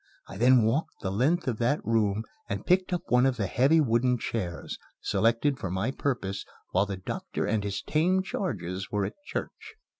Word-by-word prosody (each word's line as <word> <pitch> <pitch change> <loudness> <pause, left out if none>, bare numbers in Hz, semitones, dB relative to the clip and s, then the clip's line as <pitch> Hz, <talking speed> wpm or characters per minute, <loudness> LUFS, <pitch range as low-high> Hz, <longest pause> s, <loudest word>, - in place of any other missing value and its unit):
I - - -9
then 120 +3 +5
walked 120 +9 -1
the 95 - -2
length 145 - +1
of 115 -4 -1
that 125 +6 +2
room 110 -2 +1 0.3
and - - -3
picked 185 0 +3
up 175 -2 -1
one 125 +2 +5
of 130 -2 0
the 100 - 0
heavy 135 - +4
wooden 125 -2 +2
chairs, 95 -7 -4 0.2
selected 120 +5 +1
for 95 - -3
my 95 +8 -1
purpose 120 -9 -2 0.3
while 95 +2 +2
the 100 -1 -4
doctor 95 - -4
and 105 -1 0
his 100 -1 -3
tame 180 +5 +2
charges 95 - -3
were 105 -1 0
at - - -4
church. 440 0 -6
115 Hz, 185 wpm, -28 LUFS, 100-145 Hz, 0.3 s, then